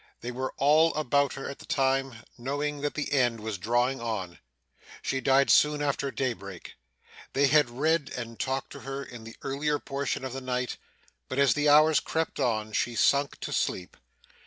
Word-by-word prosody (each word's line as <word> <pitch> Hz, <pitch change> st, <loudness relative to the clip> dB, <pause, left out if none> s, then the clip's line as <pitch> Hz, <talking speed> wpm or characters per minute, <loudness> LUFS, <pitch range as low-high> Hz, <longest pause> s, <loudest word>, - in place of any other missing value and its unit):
They 120 Hz, -, -4 dB
were 130 Hz, +2 st, -3 dB
all 155 Hz, +4 st, +4 dB
about 140 Hz, -2 st, +1 dB
her 135 Hz, -, -6 dB
at 140 Hz, -, -7 dB
the -, -, -13 dB
time, 135 Hz, -3 st, 0 dB
knowing 145 Hz, +3 st, -3 dB
that 145 Hz, 0 st, -2 dB
the 150 Hz, -, -3 dB
end 120 Hz, -4 st, +2 dB
was 105 Hz, -2 st, -4 dB
drawing 120 Hz, +5 st, +1 dB
on. 100 Hz, -7 st, -4 dB, 0.6 s
She 135 Hz, -, -1 dB
died 135 Hz, +2 st, +4 dB
soon 150 Hz, 0 st, +5 dB
after 140 Hz, -1 st, -1 dB
daybreak. 100 Hz, -10 st, -4 dB, 0.6 s
They 140 Hz, -, +4 dB
had 145 Hz, -1 st, +4 dB
read 150 Hz, +4 st, 0 dB
and 115 Hz, -1 st, -7 dB
talked 135 Hz, 0 st, -2 dB
to -, -, -9 dB
her 135 Hz, +1 st, -5 dB
in 120 Hz, -4 st, -10 dB
the 115 Hz, -, -10 dB
earlier 145 Hz, +2 st, 0 dB
portion 140 Hz, -2 st, -3 dB
of 130 Hz, -, -5 dB
the 135 Hz, -, -5 dB
night, 125 Hz, -1 st, -2 dB, 0.5 s
but 130 Hz, -, -4 dB
as 140 Hz, -1 st, +5 dB
the 150 Hz, 0 st, +2 dB
hours 155 Hz, +1 st, +6 dB
crept 160 Hz, -1 st, -2 dB
on, 110 Hz, -5 st, 0 dB
she 120 Hz, +2 st, 0 dB
sunk 140 Hz, +4 st, +2 dB
to -, -, -4 dB
sleep. 90 Hz, -, -2 dB
135 Hz, 185 wpm, -28 LUFS, 120-145 Hz, 0.6 s, hours